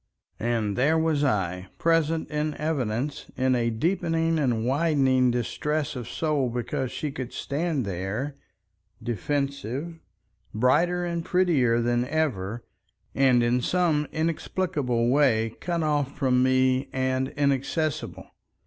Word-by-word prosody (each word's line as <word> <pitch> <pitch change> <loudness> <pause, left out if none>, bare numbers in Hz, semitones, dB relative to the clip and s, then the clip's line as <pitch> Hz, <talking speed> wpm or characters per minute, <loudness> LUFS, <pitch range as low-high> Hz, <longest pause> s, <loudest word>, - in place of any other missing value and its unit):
And 110 -3 0
there 150 +6 +3
was 160 -2 +1
I, 95 -7 0
present 165 -1 +1
in 150 0 -1
evidence, 140 -3 -2
in 130 0 +2
a 120 -2 +1
deepening 165 +5 0
and 120 -6 0
widening 135 -3 +3
distress 140 +6 -1
of 125 -2 -6
soul 150 -5 0
because 125 +2 -3
she 150 - -3
could 130 -3 -6
stand 145 -2 -2
there, 100 +9 -3 0.7
defensive, 140 - -3 0.6
brighter 170 +10 +2
and 170 -1 -2
prettier 160 -11 +2
than 120 +1 +1
ever, 120 -9 -1 0.5
and 130 -3 +4
in 120 +1 +2
some 160 -1 +1
inexplicable 155 -6 -1
way 115 -5 +2
cut 170 -2 -1
off 145 -3 0
from 125 -2 +2
me 130 +1 +2
and 130 0 0
inaccessible. 145 +2 -1
135 Hz, 120 wpm, -26 LUFS, 120-155 Hz, 0.7 s, and